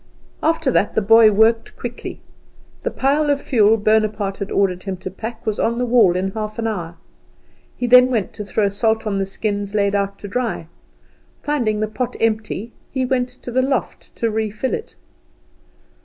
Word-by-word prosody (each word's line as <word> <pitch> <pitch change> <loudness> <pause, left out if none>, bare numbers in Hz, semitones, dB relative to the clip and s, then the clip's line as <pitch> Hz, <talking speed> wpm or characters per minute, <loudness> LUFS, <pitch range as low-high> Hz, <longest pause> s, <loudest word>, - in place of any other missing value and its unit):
After 320 -3 +1
that 210 - +1
the - - +3
boy 225 +1 +7
worked 220 +2 +2
quickly. 240 0 -7 0.6
The - - -1
pile 290 +3 +1
of 285 -1 +2
fuel 225 -5 +3
Bonaparte 215 -2 +1
had 200 - -4
ordered 185 -2 +1
him 190 -1 -5
to 185 +1 -7
pack 225 +4 -7
was 215 -2 -1
on 235 +1 +1
the 250 - 0
wall 230 -7 +4
in 190 +1 -1
half 215 0 -5
an 230 - -2
hour. 175 -7 -3 0.8
He 245 - -2
then 250 +1 +7
went 225 -6 -1
to 210 - -6
throw 205 +1 0
salt 220 +3 0
on 200 -2 -1
the 195 - -1
skins 205 0 -3
laid 200 -1 +2
out 200 -1 -1
to 205 - -8
dry. 230 -4 -2 0.8
Finding 235 -8 0
the 215 - +1
pot 240 +3 -3
empty, 220 0 -1 0.2
he 260 -1 -1
went 250 -1 0
to 250 0 -10
the 260 +2 +2
loft 265 0 -3
to 230 -1 -1
refill 220 +3 -2
it. 445 - -5
220 Hz, 185 wpm, -20 LUFS, 200-245 Hz, 0.8 s, boy